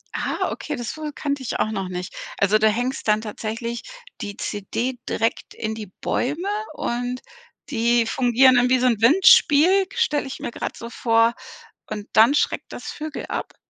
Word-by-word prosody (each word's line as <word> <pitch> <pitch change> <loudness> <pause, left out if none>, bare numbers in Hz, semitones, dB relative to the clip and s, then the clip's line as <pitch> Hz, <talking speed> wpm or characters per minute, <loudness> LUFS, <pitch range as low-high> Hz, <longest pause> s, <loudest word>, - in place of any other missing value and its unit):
Ah, - - -1
okay, 300 - -4
das 240 -4 -5
wu 310 -1 -5
kannte 285 -2 -3
ich 245 - -3
auch 215 - +1
noch 195 -3 -3
nicht. 180 0 -5 0.2
Also, 200 +2 +3
du 220 - +4
hängst 245 +4 -2
dann 215 0 +3
tatsächlich 225 +2 -5 0.4
die 205 0 -6
CD 235 +5 -3
direkt 225 - -2
in 220 0 -3
die 220 -1 -7
Bäume 300 +9 -1 0.3
und 245 +1 -3 0.5
die 235 -2 +2
fungieren 255 +2 +4
dann 245 0 +4
wie 255 - +4
so 250 - +1
'n 230 -4 +2
Windspiel, 370 - +6
stelle 300 - +1
ich 265 - -7
mir - - -4
grad - - -5
so 235 0 -8
vor. 230 0 +3 0.5
Und 210 0 -6
dann 225 +5 +6
schreckt 295 - -1
das - - -8
Vögel 310 0 -6
ab? - - -5
240 Hz, 175 wpm, -23 LUFS, 220-280 Hz, 0.5 s, Windspiel